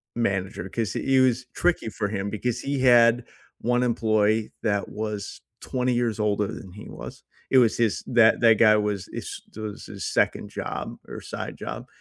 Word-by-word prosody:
manager, 95 -4 -1
'cause 110 -1 -2
he 135 0 +1
it - - +6
was 125 0 +2
tricky 175 -10 +1
for 105 0 -2
him, 100 -1 -3
because 120 +3 -2
he 140 0 -2
had 120 -1 +6 0.4
1 125 +1 +2
employee 110 -2 +1
that 100 -2 0
was 105 -1 -5 0.2
20 125 -1 -1
years 120 -3 0
older 105 -1 +1
than 95 -1 -8
he 105 - -10
was. - - -9 0.3
It 135 - +5
was 115 -3 +3
his 115 -3 +1
that 115 -2 +5
that 115 -2 +6
guy 110 -2 +7
was 105 -2 -1
is - - -6
that 110 - -8
was 105 -1 -6
his - - -6
2nd - - 0
job - - -5
or - - -7
side - - -6
job, - - -6
110 Hz, 185 wpm, -25 LUFS, 105-120 Hz, 0.4 s, guy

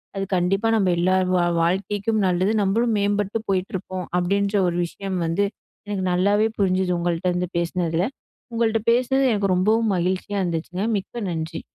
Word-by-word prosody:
அது 195 0 -2
கண்டிப்பா 195 +5 +1
நம்ம 195 -4 +2
எல்லார் 185 +2 +2
வா 175 - +3 0.2
வாழ்க்கைக்கும் 200 +5 0
நல்லது. 185 +3 +1
நம்மளும் 220 +4 +1
மேம்பட்டு 205 +1 0
போயிட்டுருப்போம் 185 -1 -2
அப்டின்ற 200 +3 0
ஒரு 175 - -1
விஷயம் 190 +2 -5
வந்து 165 +5 +1 0.4
எனக்கு 200 -2 -2
நல்லாவே 205 +4 +3
புரிஞ்சுது. 185 -1 +1
உங்கள்ட்டருந்து 175 +1 -1
பேசினதில. 170 0 0 0.5
உங்கள்ட்ட 225 -1 +1
பேசினது 255 +3 +2
எனக்கு 200 -2 +1
ரொம்பவும் 215 +4 +2
மகிழ்ச்சியா 185 +3 -1
இருந்துச்சுங்க. 175 +3 -3
மிக்க 205 +3 -5
நன்றி. 160 0 -4
190 Hz, 140 wpm, -23 LUFS, 180-205 Hz, 0.5 s, வா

